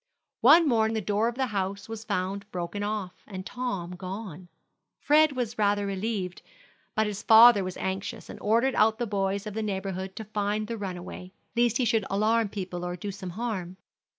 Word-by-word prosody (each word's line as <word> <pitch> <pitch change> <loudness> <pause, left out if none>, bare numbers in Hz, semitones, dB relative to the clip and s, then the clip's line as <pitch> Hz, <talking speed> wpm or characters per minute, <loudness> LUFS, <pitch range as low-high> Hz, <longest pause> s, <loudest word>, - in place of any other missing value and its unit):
One 310 +7 +7
morning 225 -3 +2
the - - +1
door 210 +3 +1
of 235 - -2
the 265 +1 0
house 200 -3 -3
was 225 -1 -6
found 200 0 -2
broken 175 +3 -4
off, 205 -3 -4
and 185 -3 -7
Tom 195 -9 -4
gone. 185 -1 -7 0.5
Fred 305 0 +4
was 245 -3 -3
rather 205 -1 +2
relieved; 195 -2 -3 0.5
but 220 0 +2
his 210 -1 -4
father 225 -2 +8
was 185 -1 -5
anxious, 190 +1 -4
and - - -9
ordered 235 +5 +2
out 220 0 +3
the 240 - -1
boys 200 -1 -1
of 210 - -5
the 220 - -2
neighborhood 190 -2 -3
to 220 - -5
find 210 0 -1
the 230 +2 -4
runaway, 185 -2 -7 0.2
lest 235 -1 +3
he 255 - +1
should 225 -3 +2
alarm 215 +2 +2
people 180 -3 -5
or 175 0 -3
do 200 +3 -5
some 190 -1 -7
harm. 185 -3 -4
205 Hz, 185 wpm, -27 LUFS, 190-225 Hz, 0.5 s, father